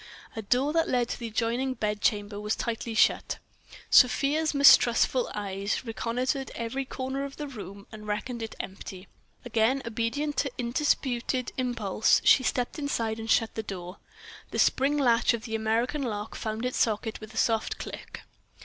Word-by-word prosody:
A 220 - -3
door 255 +8 +1
that 330 0 +2
led 245 -2 +1
to - - -4
the 235 - -4
adjoining 240 +4 -1
bedchamber 210 -1 -1
was 210 +1 -1
tightly 230 -1 -3
shut. - - +2 0.5
Sofia's 285 +4 +4
mistrustful 260 -3 +5
eyes 200 +3 -3
reconnoitred 250 +4 -2
every 235 +4 -3
corner 265 +1 -4
of 280 0 -7
the 295 - -5
room, 200 -6 -9
and 215 -1 -10
reckoned 230 +3 -3
it 225 - -6
empty. 190 0 -8 0.4
Again 240 +3 +1
obedient 230 +6 -2
to 275 - 0
undisputed 250 0 0
impulse, 235 -5 +2
she - - +7
stepped 250 +3 -1
inside 230 -6 -1
and 225 0 -6
shut 225 0 +3
the 220 - -3
door. 185 -3 -7 0.5
The - - -5
spring 280 +3 +3
latch 235 -4 +3
of 225 - -8
the 225 - -6
American 225 +6 0
lock 215 -4 -4
found 220 +2 -4
its 250 - -2
socket 220 0 0
with 215 +1 -10
a - - -7
soft 225 -1 +1
click. - - -8
235 Hz, 160 wpm, -28 LUFS, 220-260 Hz, 0.5 s, she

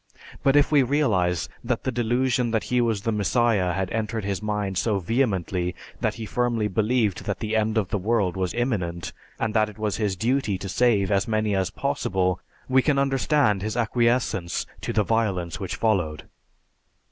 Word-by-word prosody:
But 135 0 +3
if 145 +1 +4
we 145 -2 +6
realize 105 - +1 0.2
that - - -1
the 130 - -1
delusion 120 +1 +1
that 110 -1 0
he 125 0 +1
was 110 -4 0
"The 115 - 0
Messiah" 105 -2 +2
had 95 0 -2
entered 110 -1 -2
his 100 -1 -2
mind 105 -3 -1
so 110 -3 +1
vehemently 95 -4 0 0.2
that - - 0
he 115 - -6
firmly 120 -1 0
believed 110 0 0
that 100 - -2
the 110 0 -2
end 110 0 +1
of 100 -5 0
the 105 - -1
world 100 -3 +1
was 95 -2 -2
imminent, 95 -9 -2 0.3
and 110 -1 -1
that 110 -1 +2
it 105 - -13
was 105 -2 -1
his 105 -3 0
duty 115 0 0
to 95 - -6
save 105 -1 +2
as 100 +3 +2
many 110 -2 0
as 95 -2 0
possible, 90 -1 -1 0.3
we 130 0 +4
can 145 +1 +1
understand 135 -5 +2
his 110 +3 -3
acquiescence 115 -5 +1 0.2
to - - -3
the 105 - +2
violence 95 -7 -1
which - - -4
followed. 90 -9 0
110 Hz, 180 wpm, -25 LUFS, 95-120 Hz, 0.3 s, we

